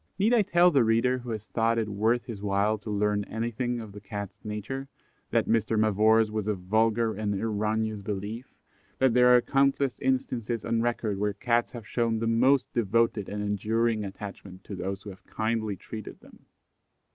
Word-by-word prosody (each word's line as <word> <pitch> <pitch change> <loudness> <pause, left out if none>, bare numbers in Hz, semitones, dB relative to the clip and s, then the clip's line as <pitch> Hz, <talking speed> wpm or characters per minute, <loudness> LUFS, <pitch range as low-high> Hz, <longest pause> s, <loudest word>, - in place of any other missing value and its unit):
Need 215 +5 +3
I 235 - +5
tell 180 -3 +4
the 135 -6 +4
reader 115 +3 +2
who 125 0 -9
has 110 -2 -4
thought 115 +1 +1
it 110 -2 0
worth 110 +4 +1
his 110 -5 -7
while 100 +1 +1
to 110 - -8
learn 105 0 +1
anything 120 +2 -2
of 110 -3 -8
the 105 +1 -11
Cat's 100 -1 -7
nature, 110 +6 -5 0.4
that - - +2
Mr. 110 0 +1
Mavor's 110 +1 +4
was 105 -1 -2
a 105 - +1
vulgar 110 +4 +1
and 105 -1 -2
erroneous 110 0 -1
belief, 105 +4 -5 0.5
and 130 -1 +4
that - - -2
there 125 0 +5
are - - +3
countless 135 -1 +1
instances 120 -3 -1
on 115 0 +1
record 115 -4 -1
where 105 0 0
Cats 120 +3 0
have 120 -3 -8
shown 115 -2 0
the 115 - -2
most 125 +4 +3
devoted 115 -2 +1
and 105 0 -3
enduring 110 +2 0
attachment 95 -1 -8
to 100 - -7
those 95 +1 -4
who 105 - -7
have 95 - -15
kindly 110 -2 -1
treated 110 +3 -9
them. - - -19
110 Hz, 185 wpm, -27 LUFS, 105-120 Hz, 0.5 s, I